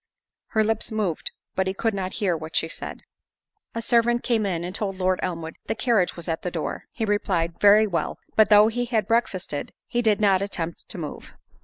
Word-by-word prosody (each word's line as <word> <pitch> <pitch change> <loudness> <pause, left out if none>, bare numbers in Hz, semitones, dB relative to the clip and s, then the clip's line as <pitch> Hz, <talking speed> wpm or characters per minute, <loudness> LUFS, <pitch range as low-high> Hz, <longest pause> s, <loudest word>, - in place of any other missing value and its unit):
Her 220 - +2
lips 225 +1 -1
moved, 205 -7 -1 0.2
but 190 0 0
he 190 - -1
could 225 +2 0
not 190 -1 -3
hear 190 -5 0
what 160 0 -7
she - - +2
said. - - -7 0.7
A 230 - -2
servant 240 0 +3
came 225 -4 +1
in, 170 -3 -2
and 180 +1 -4
told 195 -1 -2
Lord 185 0 +1
Elmwood, 165 -2 -4
"The - - -1
carriage 225 -7 +2
was 170 - -7
at 165 -1 -1
the 180 - -2
door." 165 -3 -4
He 225 - -2
replied, 185 -5 0
"Very 210 +1 +7
well." 175 -5 -2 0.2
But 220 -1 +5
though 210 0 +8
he 245 +2 -1
had 225 -4 0
breakfasted, 190 -10 -1
he 240 -1 0
did 220 -3 +3
not 195 -3 +4
attempt 170 -4 -4
to 215 - -5
move. 155 -4 -7
200 Hz, 205 wpm, -25 LUFS, 175-220 Hz, 0.7 s, though